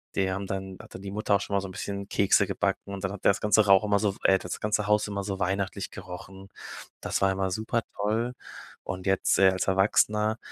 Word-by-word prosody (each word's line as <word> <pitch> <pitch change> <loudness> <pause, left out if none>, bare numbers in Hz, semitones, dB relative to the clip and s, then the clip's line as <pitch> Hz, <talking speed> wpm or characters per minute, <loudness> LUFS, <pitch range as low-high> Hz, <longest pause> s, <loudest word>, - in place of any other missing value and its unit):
die 95 -1 +1
haben 95 +1 -3
dann 95 -1 -5
hat - - -15
dann 95 - -8
die 100 - -6
Mutter 105 +1 -1
auch 100 - +1
schon 100 - -3
mal 100 - +3
so 100 - -5
'n - - -9
bisschen 100 +1 -5
Kekse 100 - +3
gebacken 100 - -2
und 95 0 -6
dann 95 - -1
hat 100 - -9
ja - - +7
das 100 - -4
ganze 105 0 +4
Rauch 95 +1 +6
immer 105 -1 +3
so, 105 -2 +1
w - - -16
äh, 95 - +6
hat 95 - -3
das 90 - -4
ganze 105 -1 0
Haus 105 0 +2
immer 100 -1 -3
so 95 -1 -4
weihnachtlich 95 +1 -2
gerochen. 95 +2 -10 0.5
Das - - -1
war 95 - +4
immer 95 0 -1
super 110 +4 -1
toll 110 +4 -1 0.5
und 95 +1 -5
jetzt, 95 0 +2
äh, 95 -1 +7
als 95 0 -1
Erwachsener, 105 +3 +2
100 Hz, 250 wpm, -27 LUFS, 95-105 Hz, 0.5 s, ja